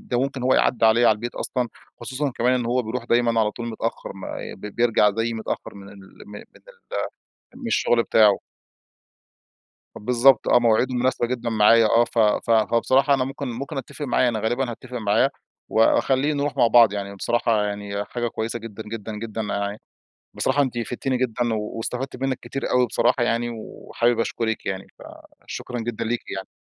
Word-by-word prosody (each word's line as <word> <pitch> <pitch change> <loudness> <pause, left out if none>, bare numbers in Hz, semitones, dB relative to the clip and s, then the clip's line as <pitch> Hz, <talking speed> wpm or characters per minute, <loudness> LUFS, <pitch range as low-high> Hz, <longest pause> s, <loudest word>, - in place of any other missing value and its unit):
ده 120 -1 -2
ممكن 135 -1 -2
هو 130 +1 +3
يعدّي 120 -3 +2
عليّا 115 +2 +5
على - - +5
البيت 120 +3 -6
أصلًا. 125 -2 -2 0.3
خصوصًا 130 +4 -2
كمان 125 +2 +2
إن 125 -2 -1
هو 125 +2 +1
بيروح 115 +2 -4
دايمًا 120 -1 +2
على 105 -1 +2
طول 120 +2 -7
متأخر، 115 -1 -4
ما 95 -1 -7
بي 105 +2 -8
بيرجع 115 -2 +3
زيي 115 +3 -2
متأخر 110 -2 -5
من 100 -1 -11
ال 100 0 -13 0.3
من 105 0 -8
ال - - -14 1.1
من 255 -2 -7
الشغل 120 - +2
بتاعه. 105 -4 +4 1.6
بالضبط، 125 +3 +3
آه، - - +6
مواعيده 120 +2 +2
مناسبة 125 -1 +1
جدًا 120 -1 -3
معايا. 115 +1 +5
آه، 115 +2 +4
ف 120 - -6
ف 110 +1 +2
هو 115 +1 +3
بصراحة 135 +3 +3
أنا 130 -2 +1
ممكن 135 +1 -5
ممكن 135 +4 -5
أتّفق 135 +3 -6
معاه. 125 -1 +2
أنا 115 -2 -1
غالبًا 120 +4 -1
هاتّفق 125 +2 -8
معاه 110 +4 +2 0.4
وأخليه 130 +5 +3
نروح 145 -1 -2
مع 120 - +5
بعض 115 -2 +6
يعني. 100 -1 -4
بصراحة 115 0 +1
يعني 100 0 -4
حاجة 120 +1 -3
كويسة 115 +1 -3
جدًا 110 -1 -8
جدًا 110 0 -7
جدًا. 110 -1 -4
ع 100 0 -2 0.6
بصراحة 145 - +1
أنتِ 125 -3 -2
فدتِني 125 +2 -2
جدًا 120 -2 0
واستفدت 115 +5 -4
منِك 130 0 -2
كتير 135 - -4
أوي 125 0 +3
بصراحة، 120 - +1
يعني، 120 0 0
وحابب 115 +1 -2
أشكرِك 115 -1 -2
يعني. 95 0 -3 0.6
فشكرًا 125 -1 -5
جدًا 115 0 -3
ليكِ 120 +1 -1 0.2
يعني. 95 - -6
115 Hz, 180 wpm, -23 LUFS, 110-125 Hz, 1.6 s, آه